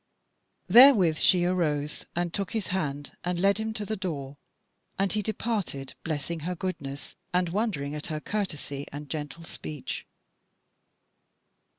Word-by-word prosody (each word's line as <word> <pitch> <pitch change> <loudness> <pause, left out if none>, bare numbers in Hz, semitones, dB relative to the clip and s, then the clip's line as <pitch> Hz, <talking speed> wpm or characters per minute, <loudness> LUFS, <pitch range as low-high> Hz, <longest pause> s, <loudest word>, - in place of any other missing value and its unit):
Therewith 205 - +8
she 180 +2 +5
arose 150 -5 0
and 175 -1 -1
took 200 -3 -2
his 220 -4 -1
hand 145 -6 -2
and 175 0 -1
led 200 +3 +4
him 220 0 -1
to 210 -2 -3
the 215 - -2
door, 145 -8 -4 0.6
and 195 -1 +1
he 215 - +1
departed, 205 - -2
blessing 160 +1 -2
her 180 +4 -3
goodness, 145 -7 -5 0.2
and 180 -1 +3
wondering 175 -8 -1
at 150 0 -4
her 155 -2 -2
courtesy 150 -8 -3
and 145 0 -7
gentle 150 +1 -4
speech. 150 -3 -5
175 Hz, 135 wpm, -28 LUFS, 145-195 Hz, 0.6 s, Therewith